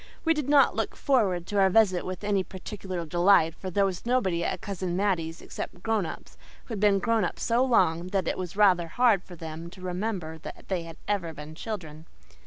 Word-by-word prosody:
We 325 - +5
did 300 -3 -3
not 285 -1 +5
look - - -2
forward 200 -11 +1
to 205 +2 -1
our 190 -1 +5
visit 190 -3 +3
with 185 +1 -6
any 200 -2 +1
particular 185 -2 -6
delight, 175 0 +4
for 185 +3 -7
there 200 +2 +2
was 185 -2 -3
nobody 210 -9 +1
at - - -1
Cousin 185 -3 -4
Mattie's 170 -5 -1
except 180 - -7
grown 220 -6 +1
ups - - -10 0.3
who - - -13
had 215 - -3
been 205 -1 +4
grown 225 +1 +1
up 175 - -2
so 235 +2 +2
long 175 -9 +2
that 190 -2 -1
it - - 0
was 180 -1 -5
rather 185 -5 +4
hard 225 +1 +3
for 180 - -12
them 165 0 -7
to 190 - -14
remember 180 -3 -3 0.3
they 185 -3 -1
had 165 -1 -10
ever 175 -6 -1
been 150 +1 -9
children. 160 -5 -7
185 Hz, 205 wpm, -27 LUFS, 170-210 Hz, 0.3 s, We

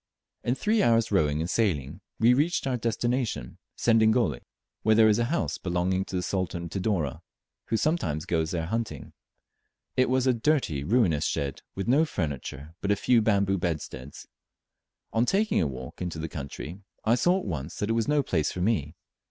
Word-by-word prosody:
In 120 - +1
three 215 +7 +1
hours' 115 -2 +3
rowing 75 -5 +2
and 80 - -1
sailing 85 - 0 0.2
we 115 +2 +6
reached 150 +6 +1
our 130 -2 0
destination, 120 - -2 0.2
Sedingole, 110 - +3 0.4
where 110 0 +4
there 110 0 +6
is 105 +1 +3
a 120 - +2
house 170 +8 -1
belonging 95 +1 0
to - - -6
the 90 - -1
Sultan 90 -3 -2
of 85 - -6
Tidore, 90 -8 -1 0.4
who 115 - 0
sometimes 110 - 0
goes 80 -2 0
there 85 -1 -2
hunting. 105 - -4 0.8
It 130 0 +3
was 130 0 +2
a 130 - +4
dirty 115 - +1
ruinous 95 - +2
shed, 70 -1 -2
with 95 - -3
no 140 +6 +5
furniture 75 - -4
but 100 - -2
a 100 - +4
few 115 +3 +3
bamboo 100 -3 +2
bedsteads. 75 -6 -4 0.9
On 115 - +3
taking 200 - +2
a 80 - +1
walk 65 +2 -8
into 90 -2 -3
the 80 +1 -3
country, 75 +3 -7 0.3
I 110 - +4
saw 175 +10 +3
at - - -4
once 80 -5 -4
that 105 +2 -1
it - - +3
was 115 -1 0
no 150 -1 +2
place 80 - 0
for 90 - -5
me. 90 -7 0
100 Hz, 185 wpm, -27 LUFS, 80-120 Hz, 0.9 s, we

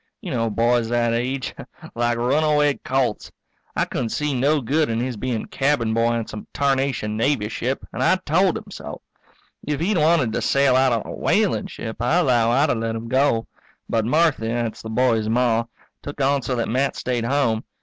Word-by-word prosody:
You - - -7
know 115 0 0
boys 115 +1 +1
that 120 -1 +1
age 125 +3 -2 0.4
like 120 0 0
runaway 150 +4 +2
colts. 130 -4 -1 0.4
I - - +1
couldn't 120 - -3
see 150 +4 -1
no 140 +4 +2
good 145 +4 0
in 115 0 -1
his 125 0 -2
being 115 0 -3
cabin 135 -5 0
boy 115 +1 +2
on 115 -1 -2
some 105 - -9
tarnation 135 -6 0
Navy 115 -2 0
ship 130 +3 -3
and - - -4
I - - +4
told 185 +1 +1
him - - -11
so. - - -8 0.6
If 150 -1 -3
he'd 180 +2 +1
wanted 150 -7 +3
to - - -1
sail 140 -2 +3
out 130 0 +4
on 115 -2 0
a - - -6
whaling - - +1
ship, 110 0 -7
I 150 +9 +2
'low 120 -7 +3
I'd 140 +6 +3
have 115 - 0
let 115 0 -2
him 115 +1 -6
go. 130 -3 +2 0.4
But 110 -1 0
Marthy 150 -3 +2
that's 115 -1 -2
the 110 - -7
boy's 110 -2 +1
Ma 115 -1 +2 0.4
took 145 +1 -8
on 140 0 +2
so 125 0 -2
that 115 - -1
Matt 130 +4 0
stayed 120 -2 -2
home. 115 -4 +1
125 Hz, 195 wpm, -22 LUFS, 115-140 Hz, 0.6 s, I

